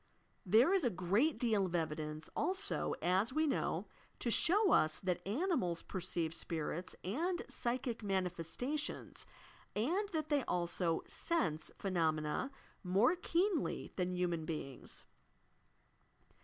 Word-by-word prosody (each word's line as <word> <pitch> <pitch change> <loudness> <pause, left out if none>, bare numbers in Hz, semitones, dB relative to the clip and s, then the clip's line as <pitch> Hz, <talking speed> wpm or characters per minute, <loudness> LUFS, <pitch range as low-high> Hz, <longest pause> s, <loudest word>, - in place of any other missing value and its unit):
There 230 - +6
is 385 -4 +3
a 245 - +4
great 205 - +2
deal 215 -6 +2
of 175 - -3
evidence, 155 -1 -2
also, 380 +5 0
as 190 +7 +2
we 310 +3 +2
know, 290 - 0 0.3
to 235 - -1
show 385 - +4
us 155 0 +4
that 185 -3 -1
animals 210 - 0
perceive 175 -3 -2
spirits 165 +2 -3
and 330 - -1
psychic 240 -1 -2
manifestations, 195 - -2 0.5
and 350 - +1
that 310 -5 -2
they 290 -3 +3
also 175 -1 0
"sense" 160 - 0
phenomena 160 - 0 0.3
more 200 - +4
keenly 355 -1 0
than 180 -1 -1
human 175 -2 0
beings. 150 -5 -6
195 Hz, 115 wpm, -36 LUFS, -, 0.5 s, There